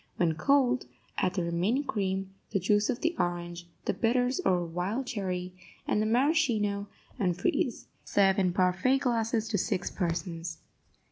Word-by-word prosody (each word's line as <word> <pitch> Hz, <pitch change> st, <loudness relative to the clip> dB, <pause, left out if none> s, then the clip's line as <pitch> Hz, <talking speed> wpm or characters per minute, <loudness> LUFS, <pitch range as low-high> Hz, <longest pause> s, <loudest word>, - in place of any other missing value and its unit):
When 170 Hz, -2 st, +2 dB
cold, 255 Hz, -, +2 dB, 0.3 s
add 185 Hz, 0 st, +1 dB
the 180 Hz, -, 0 dB
remaining 180 Hz, +11 st, +1 dB
cream, 195 Hz, -5 st, -2 dB, 0.2 s
the 200 Hz, -, 0 dB
juice 205 Hz, +3 st, +2 dB
of 240 Hz, -, -1 dB
the 330 Hz, +1 st, +1 dB
orange, 175 Hz, 0 st, -2 dB, 0.2 s
the -, -, +1 dB
bitters 245 Hz, +2 st, +1 dB
or 180 Hz, -2 st, +2 dB
wild 180 Hz, +10 st, -2 dB
cherry, 185 Hz, -5 st, -3 dB, 0.3 s
and 210 Hz, -, +2 dB
the 215 Hz, -, +1 dB
maraschino, 230 Hz, -6 st, +2 dB, 0.3 s
and 180 Hz, -5 st, +1 dB
freeze. 235 Hz, +5 st, 0 dB, 0.2 s
Serve 195 Hz, -1 st, +3 dB
in 185 Hz, -2 st, +3 dB
parfait 185 Hz, +9 st, +2 dB
glasses 230 Hz, -4 st, 0 dB
to 205 Hz, -4 st, +1 dB
six 180 Hz, -, -1 dB
persons. 170 Hz, -2 st, -3 dB
200 Hz, 150 wpm, -29 LUFS, 180-235 Hz, 0.3 s, Serve